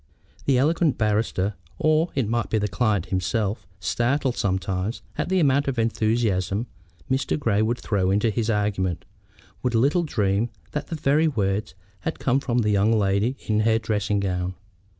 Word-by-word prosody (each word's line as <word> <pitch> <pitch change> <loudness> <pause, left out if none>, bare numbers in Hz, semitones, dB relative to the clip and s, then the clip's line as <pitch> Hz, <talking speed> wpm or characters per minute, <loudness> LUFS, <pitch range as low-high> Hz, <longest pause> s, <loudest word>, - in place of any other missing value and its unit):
The 135 -2 +3
eloquent 155 +2 +2
barrister, 105 -2 0 0.2
or 155 +2 +2
it 130 -6 +1
might 120 0 -1
be 110 - +1
the 105 -1 0
client 105 -3 0
himself, 100 +2 -1
startled 125 - 0
sometimes 95 +2 -2
at - - -2
the 190 0 +2
amount 140 -3 +3
of 135 -2 -1
enthusiasm 110 -3 +1 0.4
which 130 +1 0
Mr. - - 0
Grey 115 -8 +1
would 115 +2 +1
throw 95 -6 0
into 105 +3 +2
his 115 +1 -1
argument, 95 -5 0 0.6
would 125 -2 0
little 140 +10 +3
dream 105 - 0 0.2
that 150 - -3
the 165 - -4
very 155 +1 +2
words 100 -7 -1 0.2
had 160 +11 -3
come 135 +1 +1
from 125 -3 -1
the 105 - +1
young 100 +2 +3
lady 105 +4 +1
in 105 -1 +1
her 110 +1 +3
dressing 105 -2 0
gown. 90 -1 -2
110 Hz, 170 wpm, -24 LUFS, 100-130 Hz, 0.6 s, The